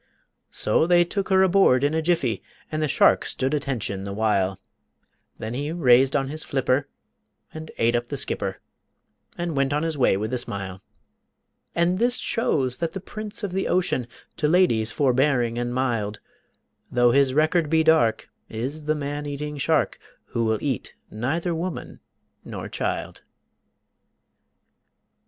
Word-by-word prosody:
So 130 Hz, +9 st, +2 dB
they 175 Hz, 0 st, +5 dB
took 195 Hz, +2 st, -3 dB
her 190 Hz, 0 st, +5 dB
aboard 185 Hz, -9 st, +4 dB
in 145 Hz, +2 st, +2 dB
a 160 Hz, -, +1 dB
jiffy, 155 Hz, -9 st, 0 dB, 0.3 s
And 155 Hz, 0 st, -2 dB
the 155 Hz, -, +1 dB
shark -, -, +4 dB
stood 130 Hz, +2 st, -2 dB
attention 120 Hz, -9 st, -1 dB
the 100 Hz, 0 st, -5 dB
while, 100 Hz, -3 st, +1 dB, 0.8 s
Then 110 Hz, +1 st, -5 dB
he 145 Hz, +4 st, -3 dB
raised 135 Hz, -5 st, +4 dB
on 135 Hz, -2 st, +1 dB
his 155 Hz, +2 st, -5 dB
flipper 135 Hz, 0 st, 0 dB, 0.7 s
and 155 Hz, 0 st, -8 dB
ate 115 Hz, +1 st, +2 dB
up 120 Hz, 0 st, -1 dB
the -, -, -4 dB
skipper -, -, -3 dB, 0.8 s
And 175 Hz, -2 st, -3 dB
went 140 Hz, 0 st, +1 dB
on 150 Hz, +2 st, 0 dB
his 160 Hz, -3 st, -2 dB
way 125 Hz, -, +4 dB
with 110 Hz, +4 st, -3 dB
a 125 Hz, -, +1 dB
smile. 95 Hz, -5 st, -5 dB, 0.9 s
And 175 Hz, +2 st, +2 dB
this 245 Hz, +1 st, +3 dB
shows 130 Hz, -, 0 dB
that 165 Hz, 0 st, -3 dB
the 195 Hz, -, -4 dB
prince 215 Hz, +3 st, -7 dB
of 200 Hz, -, -2 dB
the 190 Hz, +1 st, -1 dB
ocean, 175 Hz, -9 st, 0 dB, 0.3 s
To 150 Hz, -, +1 dB
ladies 150 Hz, -11 st, +3 dB
forbearing 130 Hz, -3 st, +1 dB
and 120 Hz, 0 st, -2 dB
mild, 115 Hz, -5 st, -1 dB, 0.7 s
Though 120 Hz, -1 st, +4 dB
his 135 Hz, 0 st, +3 dB
record 155 Hz, +1 st, +2 dB
be 160 Hz, 0 st, +3 dB
dark, 120 Hz, -9 st, +3 dB, 0.2 s
is 135 Hz, +7 st, -5 dB
the 155 Hz, 0 st, +1 dB
man 145 Hz, 0 st, -4 dB
eating 145 Hz, +1 st, -5 dB
shark 160 Hz, +2 st, +1 dB, 0.3 s
Who 115 Hz, -, -1 dB
will 110 Hz, 0 st, +1 dB
eat 135 Hz, -7 st, -3 dB, 0.2 s
neither 155 Hz, +11 st, -2 dB
woman 170 Hz, +1 st, -5 dB, 0.4 s
nor -, -, -7 dB
child. -, -, -3 dB
140 Hz, 155 wpm, -24 LUFS, 120-160 Hz, 0.9 s, they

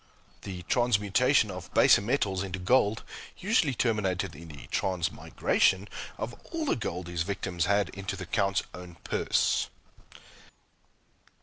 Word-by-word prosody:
The 90 Hz, -2 st, -7 dB
transmutation 120 Hz, -, +3 dB
of 90 Hz, -2 st, -8 dB
baser -, -, +6 dB
metals 100 Hz, -4 st, 0 dB
into 95 Hz, -1 st, -4 dB
gold 105 Hz, +2 st, +2 dB, 0.3 s
usually 180 Hz, -, +2 dB
terminated 95 Hz, -, 0 dB
in 85 Hz, +3 st, -11 dB
the 75 Hz, -3 st, -10 dB
transmigration 95 Hz, +2 st, +1 dB, 0.3 s
of -, -, -4 dB, 0.2 s
all 330 Hz, -2 st, -2 dB
the -, -, +2 dB
gold 90 Hz, -6 st, -4 dB
his 85 Hz, -1 st, -3 dB
victims 90 Hz, -2 st, -2 dB
had 100 Hz, 0 st, +2 dB
into 95 Hz, 0 st, -5 dB
the 95 Hz, -1 st, -6 dB
Count's 95 Hz, +2 st, +1 dB
own 90 Hz, -2 st, -10 dB
purse. -, -, +1 dB
95 Hz, 125 wpm, -29 LUFS, 90-110 Hz, 0.3 s, baser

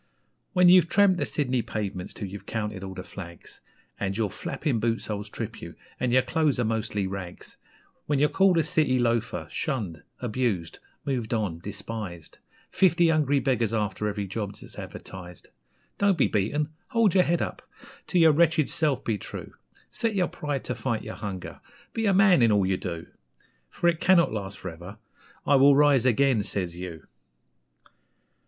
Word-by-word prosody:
When 180 Hz, -2 st, +5 dB
you've 175 Hz, -2 st, +7 dB
tramped 200 Hz, -2 st, +4 dB
the -, -, 0 dB
Sydney 130 Hz, -4 st, 0 dB
pavements 100 Hz, -5 st, -4 dB
till 100 Hz, -, -5 dB
you've 95 Hz, 0 st, -9 dB
counted 105 Hz, -4 st, -3 dB
all 95 Hz, -1 st, -7 dB
the 90 Hz, -, -6 dB
flags, 85 Hz, -3 st, -11 dB, 0.4 s
And 100 Hz, 0 st, -2 dB
your 105 Hz, -4 st, 0 dB
flapping 140 Hz, -, -2 dB
boot 115 Hz, +1 st, 0 dB
soles 105 Hz, -1 st, -4 dB
trip -, -, -6 dB
you, -, -, -9 dB, 0.2 s
and 125 Hz, -, 0 dB
your 130 Hz, +1 st, +4 dB
clothes 155 Hz, -5 st, +1 dB
are -, -, +2 dB
mostly 110 Hz, -2 st, -1 dB
rags, 95 Hz, -2 st, -7 dB, 0.5 s
When 145 Hz, -, +1 dB
you're 145 Hz, +2 st, +4 dB
called 185 Hz, +4 st, +3 dB
a 165 Hz, -, +4 dB
city 155 Hz, -5 st, +2 dB
loafer, 115 Hz, -8 st, 0 dB
shunned, 105 Hz, -, -3 dB, 0.2 s
abused, 110 Hz, -9 st, -2 dB, 0.3 s
moved 120 Hz, -5 st, -1 dB
on, 100 Hz, -7 st, -2 dB
despised 100 Hz, -3 st, -7 dB, 0.3 s
Fifty 175 Hz, -3 st, +4 dB
hungry 145 Hz, -3 st, +2 dB
beggars 120 Hz, -5 st, 0 dB
after 105 Hz, -1 st, -1 dB
every 105 Hz, -1 st, -2 dB
job 100 Hz, +1 st, -4 dB
that's -, -, -11 dB
advertised 90 Hz, -2 st, -9 dB, 0.5 s
Don't 200 Hz, -3 st, +3 dB
be 140 Hz, -, +4 dB
beaten! 145 Hz, +10 st, 0 dB, 0.2 s
Hold 230 Hz, -7 st, +3 dB
your 185 Hz, -, +5 dB
head 170 Hz, 0 st, +1 dB
up! -, -, -5 dB, 0.5 s
To 180 Hz, -, 0 dB
your 165 Hz, -2 st, +7 dB
wretched 160 Hz, -1 st, +3 dB
self 145 Hz, -5 st, +1 dB
be 110 Hz, -3 st, -1 dB
true; -, -, -8 dB, 0.4 s
Set 230 Hz, -3 st, -1 dB
your 185 Hz, -2 st, +2 dB
pride 145 Hz, -3 st, -4 dB
to 125 Hz, -, -2 dB
fight 115 Hz, -3 st, -2 dB
your -, -, -6 dB
hunger! 95 Hz, -5 st, -7 dB, 0.3 s
Be 225 Hz, -1 st, 0 dB
a 200 Hz, -, +4 dB
MAN 190 Hz, -6 st, +6 dB
in 115 Hz, -2 st, +5 dB
all 100 Hz, -2 st, +3 dB
you 95 Hz, 0 st, +1 dB
do! 85 Hz, -3 st, -5 dB, 0.6 s
For 175 Hz, -, -1 dB
it 170 Hz, -2 st, +2 dB
cannot 175 Hz, -, +4 dB
last 100 Hz, -2 st, -5 dB
for 95 Hz, -, -6 dB
ever 90 Hz, +6 st, -11 dB, 0.5 s
'I 140 Hz, -, +5 dB
will 140 Hz, +1 st, +7 dB
rise 140 Hz, -3 st, +4 dB
again!' 130 Hz, -1 st, +3 dB
says 95 Hz, -4 st, -3 dB
you. 90 Hz, -3 st, -8 dB
115 Hz, 175 wpm, -26 LUFS, 100-150 Hz, 0.6 s, you've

